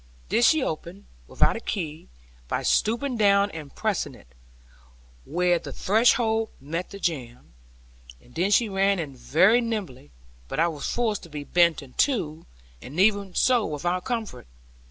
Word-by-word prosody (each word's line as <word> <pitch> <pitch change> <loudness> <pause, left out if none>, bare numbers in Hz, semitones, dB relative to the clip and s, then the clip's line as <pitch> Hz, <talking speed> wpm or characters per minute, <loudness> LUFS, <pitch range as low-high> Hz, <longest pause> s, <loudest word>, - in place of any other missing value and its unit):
This 240 - +4
she 315 -4 +3
opened, 170 +1 -5 0.2
without - - +2
a - - -4
key, 165 -9 -5 0.4
by - - -2
stooping 240 +4 +1
down 200 -1 +4
and 155 -3 -9
pressing - - -2
it, - - -17 1.0
where 175 +2 +1
the 155 -4 -8
threshold 220 - +2
met 165 +6 -5
the 200 - -9
jamb; 125 - -4 0.7
and 125 - -21
then 180 +4 0
she 225 +3 +4
ran 195 0 +1
in 150 -6 -5
very 190 - +3
nimbly, 200 - -5 0.4
but 135 - -4
I 170 +1 +3
was 150 -4 -5
forced 225 -4 -1
to 170 - -13
be 150 -1 -6
bent 170 -1 +2
in 130 -2 -15
two, 165 - 0 0.3
and 145 +7 -7
even 200 -2 +2
so 250 -3 +3
without 175 +4 -2
comfort. 220 - -4
180 Hz, 155 wpm, -25 LUFS, 155-220 Hz, 1.0 s, This